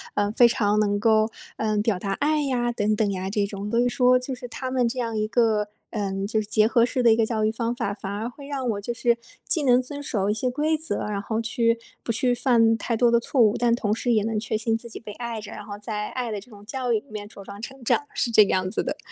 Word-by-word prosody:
呃， 205 0 +1
非 240 - +7
常 210 -3 +1
能 205 -1 +1
够， 220 0 +3 0.3
呃， 215 -1 0
表 205 -3 +1
达 195 0 -2
爱 300 +6 +1
呀 240 -3 0
等 215 -2 0
等 205 -2 +1
呀 190 0 -3
这 205 0 0
种， 200 0 -5
所 235 - +1
以 245 - +3
说 250 0 +4
就 255 +1 -4
是 250 0 -7
他 255 +2 -5
们 250 -2 +2
这 255 - -6
样 230 -2 -2
一 215 0 0
个， 220 -3 +2 0.2
嗯， 195 -3 -2
就 215 +1 0
是 210 - -8
结 215 0 +3
合 235 +1 +4
式 250 +1 0
的 230 - +7
一 - - +3
个 225 - +2
教 220 -1 0
育 215 - +2
方 230 +1 -2
法， 200 -4 -2
反 200 -1 -6
而 215 +3 -3
会 280 +3 -10
让 270 -3 -3
我 205 -1 -4
就 240 +4 -3
是 235 -1 +2 0.3
既 315 - +2
能 250 -2 +5
遵 285 +3 -6
守 205 -8 -1
一 210 - +2
些 250 +4 -1
规 300 +5 +1
则， 310 -11 -3
然 205 -1 -2
后 220 +2 -2
去 230 0 +1 0.2
不 230 - -2
去 245 +2 +2
犯 230 -3 +3
太 230 0 -1
多 240 0 +4
的 235 - +5
错 250 +3 -2
误， 215 -3 +5
但 235 -1 +3
同 210 -3 0
时 240 +2 -1
也 215 -3 +3
能 220 -1 -1
确 220 - -2
信 225 +1 0
自 235 +1 -7
己 - - -8
被 215 -2 -9
爱 235 0 -5
着， 210 - -9
然 210 - -8
后 205 0 -7
在 210 0 -4
爱 245 -3 -3
的 205 - -4
这 235 - -17
种 205 -1 -14
教 255 0 -2
育 220 - +3
里 230 - -24
面 205 -1 -6
茁 200 -3 -12
壮 200 +1 -9
成 270 +1 -8
长， 290 +5 +1
是 235 - 0
这 215 -1 +8
个 - - -2
样 185 0 0
子 - - 0
的。 - - -3
225 Hz, 310 characters per minute, -25 LUFS, 210-245 Hz, 0.3 s, 这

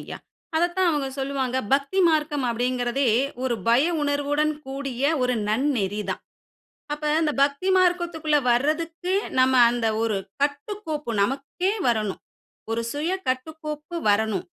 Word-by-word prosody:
ஐயா. - - -7 0.4
அத 345 - +4
தான் 375 -1 +3
அவங்க 290 -4 -1
சொல்லுவாங்க, 265 -2 -1 0.2
"பக்தி 280 +7 +1
மார்க்கம் 300 -3 +1
அப்டிங்கறதே 245 +2 0 0.3
ஒரு 255 -2 0
பய 240 +5 +5 0.2
உணர்வுடன் 290 +1 +1
கூடிய 270 -2 -5 0.2
ஒரு 250 0 +1
நன்னெறி 215 -4 0
தான்." - - -3 0.7
அப்ப 300 0 -1
அந்த 310 -2 +1
பக்தி 280 +7 +1
மார்க்கத்துக்குள்ள 345 -4 +2
வர்றதுக்கு, 325 +8 0 0.3
நம்ம 260 0 +4 0.2
அந்த 240 -1 -1 0.2
ஒரு 225 -3 0 0.3
கட்டுக்கோப்பு 305 - -3
நமக்கே 275 - -1 0.2
வரணும். 215 -4 0 0.5
ஒரு 230 +1 0
சுய 310 +5 -1 0.2
கட்டுக்கோப்பு 305 +4 -4
வரணும். 205 -2 +1
280 Hz, 125 wpm, -24 LUFS, 245-310 Hz, 0.7 s, பய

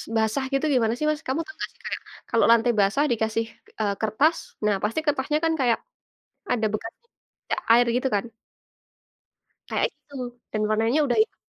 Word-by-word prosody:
basah 220 +4 +1
gitu 275 +3 +2
gimana 230 -3 +3
sih 305 - -1
Mas? 305 0 -1
Kamu 265 +4 0
tau 390 - -10
nggak - - -4
sih - - -30
kayak - - -3 0.3
kalau 230 - +3
lantai 235 +1 +5
basah 200 +8 +3
dikasih, 225 0 0 0.3
eee, 205 -2 +1
kertas, 250 +10 +3 0.3
nah 210 -1 +3
pasti 220 +8 0
kertasnya 295 0 +1
kan 325 - +2
kayak 240 -4 +3 0.7
ada 225 -3 +1
bekas 225 +2 -3
bercak 470 - -7
air 240 +1 +5
gitu 255 +2 +1
kan? 200 - 0 1.4
Kayak - - +1
gitu 285 - -20 0.4
dan 215 - 0
warnanya 225 +6 +2
udah 255 - +1
yang 440 - +2
235 Hz, 170 wpm, -25 LUFS, 220-285 Hz, 1.4 s, lantai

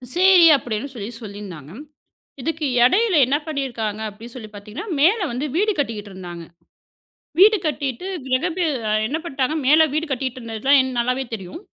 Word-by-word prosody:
சேரி 370 -1 +6
அப்டின்னு 240 +2 -5
சொல்லிச் 230 +1 -7
சொல்லிருந்தாங்க. 195 -8 -9 0.7
இதுக்கு 320 +3 -2 0.2
எடையில 390 - +3
என்ன 270 +4 +1
பண்ணிருக்காங்க 240 -8 -3
அப்டின்னு 225 +3 -12
சொல்லிப் 215 -4 -10
பாத்தீங்கன்னா, 210 - -8
மேல 355 +10 +5
வந்து 255 +5 -3
வீடு 420 +5 +2
கட்டிகிட்டு 215 -7 -3
இருந்தாங்க. 175 -2 -8 1.0
வீடு 425 +3 +7
கட்டிட்டு 285 -1 -3 0.2
கிரகப்ரெ 330 +7 0 0.4
என்ன 300 +7 -2
பண்ணிட்டாங்க. 275 -3 -2
மேல 315 +2 +6
வீடு 310 +2 0
கட்டிட்டு 260 -1 -3
இருந்தது 225 -2 -7
எல்லாம் 265 -1 +3
நல்லாவே 250 +2 0
தெரியும். 195 - -7
260 Hz, 145 wpm, -21 LUFS, 220-315 Hz, 1.0 s, வீடு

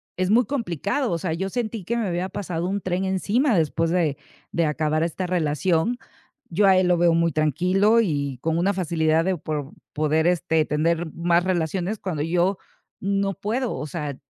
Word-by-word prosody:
es 185 0 -1
muy 235 +4 +4
complicado. 230 - -2
O 170 - 0
sea, 165 -1 -2
yo 190 +4 -2
sentí 225 -1 -3
que 235 +7 -2
me 225 -3 -1
había 180 +1 -2
pasado 175 -3 -3
un 200 +1 -2
tren 185 +1 -1
encima 205 +6 +1
después 165 +1 +1
de 165 -5 +1 0.4
de 170 -1 +1
acabar 155 +1 0
esta 170 +2 -2
relación. 170 - +1 0.5
Yo 195 +4 +3
a 190 - +6
él 185 -1 +3
lo 180 - +3
veo 170 0 +4
muy 170 0 +2
tranquilo, 180 - +2
y 140 - -1
con 165 0 0
una 195 +3 +2
facilidad 165 -2 +1
de 185 -2 0
pro 150 -1 -4 0.2
poder 155 +2 +1
este, 160 -3 +2
tener 165 +2 0
más 170 +1 +2
relaciones 180 +3 -1
cuando 170 -6 -3
yo 175 +4 +1 0.4
no 195 0 0
puedo. 225 +6 -2
O 150 - -5
sea, 150 -3 -4
175 Hz, 185 wpm, -24 LUFS, 160-195 Hz, 0.5 s, a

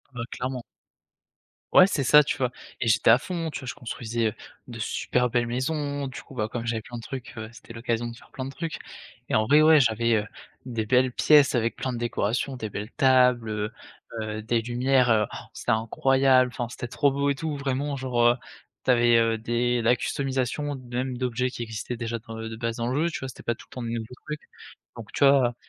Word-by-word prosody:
Ouais, 115 - -3
clairement. 125 0 -4 1.1
Ouais, 185 - +9
c'est 145 -8 -1
ça, 150 +4 +8
tu 145 - -2
vois? 125 -2 +1 0.3
Et 120 - -1
j'étais 110 0 +4
à 115 - +8
fond, 165 +3 -4
tu - - -5
vois, 130 - -9
je - - -3
construisais, 120 -3 -3
heu, 105 - -2 0.4
de - - -8
super 125 0 0
belles 120 0 +1
maisons, 140 +3 -2
du 130 - -8
coup - - -15
bah 110 -4 -1
comme 115 +1 -5
j'avais 115 -1 -1
plein 120 - -10
de - - -7
trucs, 130 -2 -7
heu, 110 0 -6
c'était 115 0 -13
l'occasion 115 0 -2
de 115 - -7
faire - - -18
plein 130 -1 -5
de 135 - -6
trucs 165 +3 -5 0.5
et - - 0
en 110 - +3
vrai, 150 +6 +6
ouais, 155 -1 +7
j'avais, 115 -1 +2
heu, 105 -1 0 0.4
des 115 -4 -3
belles 130 +2 +3
pièces 145 +1 +5
avec 115 -1 0
plein 130 - -3
de 120 - -4
décorations, 120 +3 -1
des 110 -4 -5
belles 105 +2 -5
tables, 125 -3 +4
heu 105 0 -2 0.5
heu, 110 0 -4
des 115 +1 0
lumières, 125 +2 +2
heu, 105 -1 +4 0.3
c'est - - -7
incroyable, 130 +3 +3
enfin 120 +1 -3
c'était 120 - -6
trop 140 +4 +2
beau 140 +1 0
et 140 - +1
tout, 150 +1 -3
vraiment 140 +1 -2
genre, 130 -2 -1
heu, 120 0 +6 0.5
tu - - +4
avais, 120 -1 +5
heu, 115 -1 +2
des, 120 +2 0
la 120 +2 +3
customisation 135 +2 -2
d 125 -2 -10
même 125 0 -2
d'objets 125 0 -1
qui 120 - -5
existaient 110 +2 -5
déjà, 115 0 -3
enfin, 115 0 -7
heu, 115 - -5
de 110 - -6
base 115 0 -3
dans 115 0 -2
le 130 +3 -1
jeu, 170 - +1
tu - - -4
vois, 130 - -5
c'était 130 - -10
pas 120 - -1
tout - - -15
le - - -15
temps 125 - -4
de 115 - -3
nouveaux 115 -1 -3 0.2
trucs. 150 0 -4 0.6
Donc 115 -2 -10
tu - - +1
vois, 135 -3 +5
125 Hz, 235 wpm, -26 LUFS, 115-135 Hz, 1.1 s, Ouais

